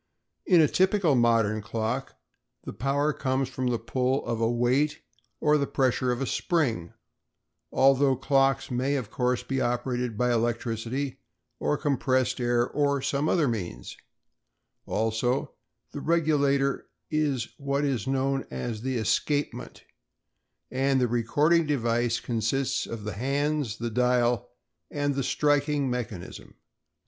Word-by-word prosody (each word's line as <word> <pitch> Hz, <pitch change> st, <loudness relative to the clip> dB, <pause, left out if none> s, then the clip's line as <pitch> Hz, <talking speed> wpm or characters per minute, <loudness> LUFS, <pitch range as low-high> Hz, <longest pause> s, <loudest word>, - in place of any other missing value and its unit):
In 175 Hz, -3 st, +6 dB
a 155 Hz, -, +5 dB
typical 190 Hz, -1 st, +2 dB
modern 115 Hz, -3 st, +2 dB
clock 115 Hz, +6 st, -3 dB, 0.5 s
the -, -, -7 dB
power 140 Hz, +4 st, 0 dB
comes 130 Hz, -1 st, -1 dB
from 130 Hz, -1 st, -3 dB
the 120 Hz, -1 st, +1 dB
pull 130 Hz, +3 st, -1 dB
of 115 Hz, -1 st, -2 dB
a 115 Hz, -, +2 dB
weight 130 Hz, +5 st, +1 dB, 0.4 s
or 150 Hz, 0 st, +3 dB
the 140 Hz, -, 0 dB
pressure 130 Hz, -1 st, +1 dB
of 125 Hz, +2 st, -2 dB
a -, -, 0 dB
spring—although 135 Hz, -, -1 dB
clocks 135 Hz, 0 st, +1 dB
may, 130 Hz, +3 st, 0 dB
of 120 Hz, -6 st, -4 dB
course, 125 Hz, -1 st, 0 dB
be 135 Hz, -1 st, -2 dB
operated 120 Hz, -1 st, -1 dB
by 125 Hz, +1 st, +2 dB
electricity 120 Hz, +3 st, -2 dB, 0.4 s
or 150 Hz, -, 0 dB
compressed 130 Hz, -3 st, 0 dB
air 120 Hz, 0 st, +2 dB
or 140 Hz, -2 st, 0 dB
some 140 Hz, +2 st, 0 dB
other 160 Hz, -5 st, +2 dB
means; 90 Hz, -, -4 dB, 0.9 s
also, 115 Hz, +4 st, 0 dB, 0.4 s
the 145 Hz, -, -6 dB
regulator 140 Hz, -4 st, +1 dB, 0.2 s
is 145 Hz, -6 st, 0 dB
what 140 Hz, +1 st, 0 dB
is 130 Hz, -6 st, -1 dB
known 135 Hz, 0 st, 0 dB
as 105 Hz, -, -4 dB
the 130 Hz, 0 st, -2 dB
"escapement" 145 Hz, +6 st, -1 dB, 0.9 s
and 135 Hz, +1 st, +2 dB
the 125 Hz, -, +2 dB
recording 145 Hz, +8 st, +2 dB
device 120 Hz, -4 st, +1 dB
consists 120 Hz, +3 st, -1 dB
of 115 Hz, -2 st, -6 dB
the 105 Hz, -1 st, -4 dB
hands, 140 Hz, 0 st, -1 dB
the 120 Hz, 0 st, -3 dB
dial, 125 Hz, -1 st, +1 dB, 0.4 s
and 145 Hz, 0 st, -1 dB
the 135 Hz, -, -1 dB
striking 145 Hz, -1 st, +1 dB
mechanism. 115 Hz, -7 st, -6 dB
130 Hz, 130 wpm, -27 LUFS, 120-140 Hz, 0.9 s, In